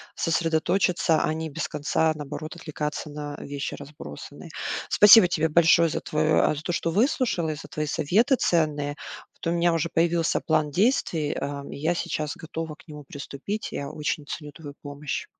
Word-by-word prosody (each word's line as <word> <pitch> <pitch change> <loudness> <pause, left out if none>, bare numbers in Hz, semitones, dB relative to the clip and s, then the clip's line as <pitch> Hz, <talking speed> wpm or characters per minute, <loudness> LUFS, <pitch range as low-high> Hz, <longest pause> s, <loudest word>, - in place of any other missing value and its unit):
сосредоточиться, 165 +1 +1
а - - +1
не 160 0 -4
без 145 +2 -3
конца, 155 +2 +1
наоборот, 155 +2 -6
отвлекаться 150 -2 -5
на 145 0 -6
вещи 140 0 -5
разбросанные. 145 - -10 0.4
Спасибо 210 -1 +8
тебе 160 -2 0
большое 165 +1 +5
за - - -2
твое 155 0 +2
а, - - +2
за 150 - -7
то, 175 - -2
что 170 - -1
выслушала 210 - +1
и 155 - -2
за - - -10
твои 155 - -3
советы 195 - +2
ценные. 150 -4 +1 0.4
Вот - - -12
у - - +1
меня 170 0 +3
уже 165 0 0
появился 165 0 +2
план 155 -2 +1
действий, 175 - +1
эм, 140 0 -5
и - - -7
я 160 +4 +1
сейчас 150 -3 -3
готова 160 0 -6
к 160 - -21
нему 150 -1 -9
приступить. 145 +9 -5
Я 140 0 -4
очень 150 -1 -3
ценю 150 0 -6
твою 145 -1 -10
помощь. 145 0 -5
155 Hz, 175 wpm, -25 LUFS, 150-170 Hz, 0.4 s, Спасибо